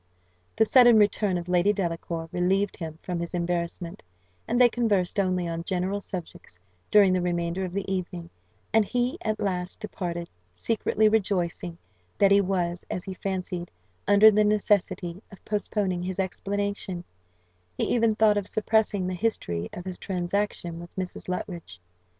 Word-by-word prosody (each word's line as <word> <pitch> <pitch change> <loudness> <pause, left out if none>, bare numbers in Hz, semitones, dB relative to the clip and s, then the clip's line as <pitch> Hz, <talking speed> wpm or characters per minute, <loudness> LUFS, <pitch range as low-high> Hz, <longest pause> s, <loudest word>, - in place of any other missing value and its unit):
The 220 - +4
sudden 240 -1 +7
return 205 -2 +3
of 175 0 -5
Lady 180 +2 +3
Delacour 165 -3 -3
relieved 190 +2 +1
him 160 -2 -6
from 180 -2 -3
his 170 +1 -4
embarrassment, 170 0 -3 0.5
and 240 +2 +1
they 250 - +8
conversed 210 -6 +1
only 185 -2 +1
on 165 0 -3
general 185 +2 -1
subjects 175 - -8 0.3
during 200 -3 +6
the 185 - +1
remainder 175 +1 -1
of 180 - -5
the 200 0 -2
evening; 175 -2 -4 0.4
and 220 -1 +6
he 245 +4 -1
at 215 -1 -1
last 180 -2 -2
departed, 175 -5 -4 0.3
secretly 215 - +1
rejoicing 180 -5 0 0.4
that 200 -1 +5
he 200 0 +6
was, 180 -2 -1
as 180 - -3
he 190 - -5
fancied, 185 -2 -4 0.4
under 205 +2 +8
the 210 0 +4
necessity 195 -4 +1
of 195 - -15
postponing 205 -3 -1
his 185 0 -4
explanation; 195 -1 -2 0.7
he - - 0
even 230 -2 +2
thought 215 -1 +4
of 200 -1 -2
suppressing 215 -3 +1
the 185 - -2
history 90 - -2
of 175 - -8
his 185 -1 -6
transaction 180 -2 -2
with 175 0 -11
Mrs. 185 -1 -5
Luttridge. 170 - -5
185 Hz, 155 wpm, -26 LUFS, 175-205 Hz, 0.7 s, they